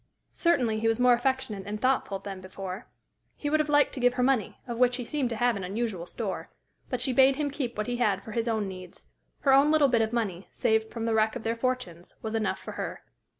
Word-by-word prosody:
Certainly 250 Hz, -11 st, +2 dB
he 225 Hz, -, +1 dB
was 225 Hz, +1 st, +2 dB
more 250 Hz, 0 st, +6 dB
affectionate 240 Hz, -5 st, -1 dB
and 210 Hz, +1 st, -4 dB
thoughtful 255 Hz, -5 st, +1 dB
than 195 Hz, -1 st, -7 dB
before. 185 Hz, +1 st, -7 dB, 0.5 s
He 290 Hz, -, -3 dB
would 310 Hz, -, +3 dB
have 305 Hz, 0 st, 0 dB
liked 290 Hz, -1 st, +4 dB
to 275 Hz, -, -5 dB
give 245 Hz, 0 st, +3 dB
her 250 Hz, -, +1 dB
money, 250 Hz, -6 st, +1 dB
of 235 Hz, -1 st, -4 dB
which 250 Hz, 0 st, +4 dB
he 250 Hz, -, -5 dB
seemed 280 Hz, -2 st, -1 dB
to 230 Hz, -, -2 dB
have 240 Hz, +1 st, +2 dB
an 195 Hz, -, -4 dB
unusual 195 Hz, -2 st, -3 dB
store; 205 Hz, -2 st, -4 dB, 0.4 s
but 250 Hz, -2 st, -2 dB
she 255 Hz, +1 st, +1 dB
bade 265 Hz, +2 st, +6 dB
him 290 Hz, -1 st, -1 dB
keep 255 Hz, -5 st, -4 dB
what 215 Hz, -, -1 dB
he 245 Hz, 0 st, -2 dB
had 205 Hz, -5 st, +1 dB
for 225 Hz, -, -8 dB
his 230 Hz, +2 st, -1 dB
own 220 Hz, -3 st, 0 dB
needs. 185 Hz, -2 st, -10 dB, 0.4 s
Her 275 Hz, -, +4 dB
own 275 Hz, +2 st, +6 dB
little 305 Hz, -3 st, +4 dB
bit 235 Hz, -2 st, +3 dB
of 220 Hz, 0 st, 0 dB
money, 205 Hz, -6 st, -2 dB
saved 220 Hz, 0 st, +1 dB
from 230 Hz, -1 st, -4 dB
the 230 Hz, -, +1 dB
wreck 220 Hz, 0 st, +2 dB
of -, -, -5 dB
their 225 Hz, +1 st, 0 dB
fortunes, 230 Hz, -9 st, -3 dB
was 220 Hz, 0 st, -3 dB
enough 220 Hz, -1 st, 0 dB
for -, -, -8 dB
her. -, -, -5 dB
230 Hz, 245 wpm, -28 LUFS, 210-255 Hz, 0.5 s, more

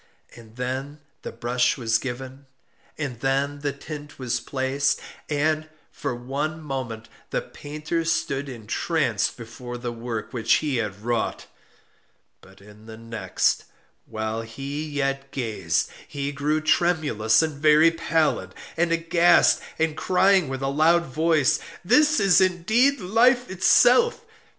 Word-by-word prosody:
And 115 Hz, -1 st, -15 dB
then 130 Hz, +4 st, -4 dB, 0.2 s
the -, -, -6 dB
brush 120 Hz, +1 st, 0 dB
was 115 Hz, -2 st, +1 dB
given, 130 Hz, +2 st, -7 dB, 0.5 s
and 135 Hz, -6 st, -4 dB
then 140 Hz, +2 st, 0 dB
the 145 Hz, 0 st, -2 dB
tint 145 Hz, +1 st, -9 dB
was 125 Hz, -2 st, -2 dB
placed; 135 Hz, +2 st, -1 dB, 0.3 s
and, 155 Hz, +1 st, 0 dB, 0.2 s
for 125 Hz, -, -4 dB
one 140 Hz, +6 st, -3 dB
moment, 130 Hz, -7 st, -5 dB, 0.2 s
the -, -, -2 dB
painter 155 Hz, +3 st, -4 dB
stood 140 Hz, -4 st, -1 dB
entranced 120 Hz, -, -1 dB
before 120 Hz, +1 st, -8 dB
the 120 Hz, 0 st, -4 dB
work 115 Hz, -1 st, -5 dB
which 115 Hz, -3 st, +2 dB
he 145 Hz, -5 st, +1 dB
had 105 Hz, -3 st, -3 dB
wrought; 120 Hz, -1 st, -2 dB, 1.0 s
but 95 Hz, +1 st, -18 dB
in 105 Hz, +2 st, -16 dB
the 110 Hz, 0 st, -9 dB
next, 115 Hz, 0 st, -1 dB, 0.4 s
while 110 Hz, +1 st, -3 dB
he 140 Hz, +7 st, -6 dB
yet 135 Hz, -1 st, -2 dB
gazed, 110 Hz, -11 st, -1 dB, 0.2 s
he 140 Hz, 0 st, -4 dB
grew 150 Hz, +2 st, -1 dB
tremulous 155 Hz, -9 st, +2 dB
and 150 Hz, -3 st, -4 dB
very 155 Hz, +2 st, +6 dB
pallid, 165 Hz, -1 st, 0 dB, 0.2 s
and 170 Hz, 0 st, +1 dB
aghast, 170 Hz, +1 st, +4 dB, 0.2 s
and 160 Hz, -1 st, 0 dB
crying 190 Hz, -3 st, +3 dB
with 135 Hz, 0 st, -4 dB
a -, -, 0 dB
loud 160 Hz, +5 st, +3 dB
voice, 155 Hz, 0 st, +2 dB, 0.3 s
'This 300 Hz, -, +4 dB
is 195 Hz, -2 st, +5 dB
indeed 220 Hz, +10 st, +2 dB
Life 240 Hz, +5 st, +3 dB
itself! 460 Hz, -, +4 dB
140 Hz, 130 wpm, -24 LUFS, 120-160 Hz, 1.0 s, very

